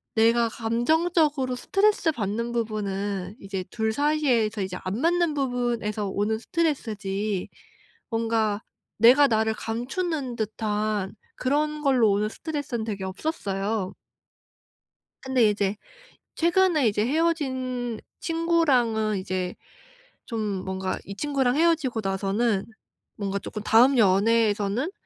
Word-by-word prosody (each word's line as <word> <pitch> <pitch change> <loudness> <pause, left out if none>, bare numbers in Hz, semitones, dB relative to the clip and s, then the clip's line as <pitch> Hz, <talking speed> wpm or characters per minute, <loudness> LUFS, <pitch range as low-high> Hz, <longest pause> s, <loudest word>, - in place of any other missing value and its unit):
내가 230 +1 +4
감정적으로 275 +4 +1
스트레스받는 250 - 0
부분은 205 -3 -3
이제 195 -2 -4
둘 220 -1 -1
사이에서 255 -7 +1
이제 185 -1 -4
안 195 +5 -2
맞는 340 0 +2
부분에서 240 -6 -1
오는 210 +3 -1
스트레스지 215 - -2 0.6
뭔가 225 -2 0 0.4
내가 255 +6 +7
나를 220 -1 +1
감추는 260 +4 -3
듯한 215 -2 -2 0.2
그런 300 +3 0
걸로 255 -7 +4
오는 210 +2 +1
스트레스는 285 -5 -4
되게 200 -3 -4
없었어요. 195 - -3 1.3
근데 255 -5 +3
이제 205 -1 0 0.6
최근에 340 -5 +3
이제 210 0 +1
헤어진 260 -6 -1 0.2
친구랑은 270 - +1
이제 185 -1 -3 0.7
좀 230 -2 -4 0.3
뭔가 190 0 -2
이 200 - -7
친구랑 270 0 0
헤어지고 305 -8 +2
나서는 195 +2 0 0.5
뭔가 200 -1 -2
쪼끔 210 +2 -6
'다음 250 +5 +5
연애에서는 215 - +2
230 Hz, 265 characters per minute, -25 LUFS, 205-280 Hz, 1.3 s, 내가